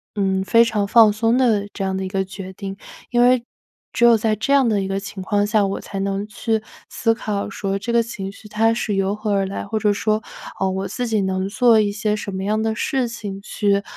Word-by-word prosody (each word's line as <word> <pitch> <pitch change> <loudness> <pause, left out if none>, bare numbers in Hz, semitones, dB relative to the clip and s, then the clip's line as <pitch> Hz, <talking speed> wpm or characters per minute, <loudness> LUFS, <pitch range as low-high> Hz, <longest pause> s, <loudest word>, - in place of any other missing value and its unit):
嗯， 190 -1 0
非 230 +4 +5
常 210 -3 0
放 220 -1 +6
松 225 +3 +2
的 215 -6 +2
这 195 - -4
样 190 0 -1
的 190 - -2
一 - - -3
个 190 -1 -1
决 190 0 -8
定， 195 0 -6 0.4
因 240 0 +3
为 245 -1 +4 0.5
只 235 - 0
有 235 -1 +7
在 215 0 +1
这 225 +6 -2
样 270 -3 +5
的 205 -3 +1
一 190 - -3
个 195 0 -1
情 195 -1 -7
况 205 +1 +1
下， 210 -2 +3
我 195 - -2
才 195 - -6
能 195 +1 -2
去 220 +1 -1 0.3
思 225 - +1
考 210 -3 -3
说 195 0 -3
这 235 +4 -3
个 235 -1 +4
情 195 -4 -6
绪 210 +2 -14
它 225 +2 +2
是 215 -3 -2
由 195 +1 0
何 210 0 -3
而 195 -1 +2
来， 195 - -5
或 220 +2 -2
者 210 -1 +2
说， 215 +1 0 0.4
呃， 190 - +1
我 190 +1 -3
自 245 -1 -3
己 215 -3 +1
能 190 0 -1
做 230 0 +4
一 205 -1 +1
些 210 +1 -1
什 205 -1 -5
么 190 0 -3
样 215 +2 0
的 220 0 -1
事 260 +1 0
情 205 -4 -6
去， 200 -1 0
210 Hz, 260 characters per minute, -21 LUFS, 195-225 Hz, 0.5 s, 有